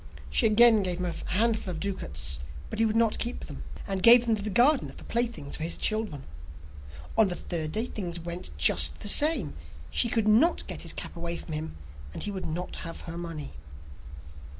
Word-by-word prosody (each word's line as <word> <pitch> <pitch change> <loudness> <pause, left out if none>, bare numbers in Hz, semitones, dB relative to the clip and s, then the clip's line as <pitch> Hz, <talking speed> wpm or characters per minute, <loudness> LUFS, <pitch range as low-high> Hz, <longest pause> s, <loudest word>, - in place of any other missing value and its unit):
She 230 - +4
again 220 0 +6
gave 180 -2 -2
him 180 - -3
a 170 -2 -5
handful 220 0 +1
of 170 -3 -4
ducats, 80 - -4 0.3
but - - -4
he 225 - +4
would 215 - -2
not 225 -1 +2
keep 240 +1 -3
them, - - -9 0.2
and 195 -2 -3
gave 240 +2 +8
them 225 -2 +2
to 210 - -5
the 210 - -3
gardener 255 +7 +4
for - - -13
playthings 235 -11 -1
for - - -10
his 165 - -2
children. 215 -11 -1 0.9
On 220 -2 +5
the 180 - -3
third 160 -4 -4
day 220 +2 -1
things 175 -8 -5
went 170 +1 -6
just 75 +1 +4
the 210 - -4
same; 280 - +4 0.4
she 235 - +4
could 225 -2 0
not 245 +12 +3
get - - -7
his - - -4
cap - - -8
away 170 0 -4
from 160 - -8
him, 155 - -5 0.4
and - - -3
he 205 - -2
would 190 -2 -5
not 175 +3 -4
have 165 - -7
her 165 - -7
money. 165 -5 -6
195 Hz, 205 wpm, -27 LUFS, 170-225 Hz, 0.9 s, gave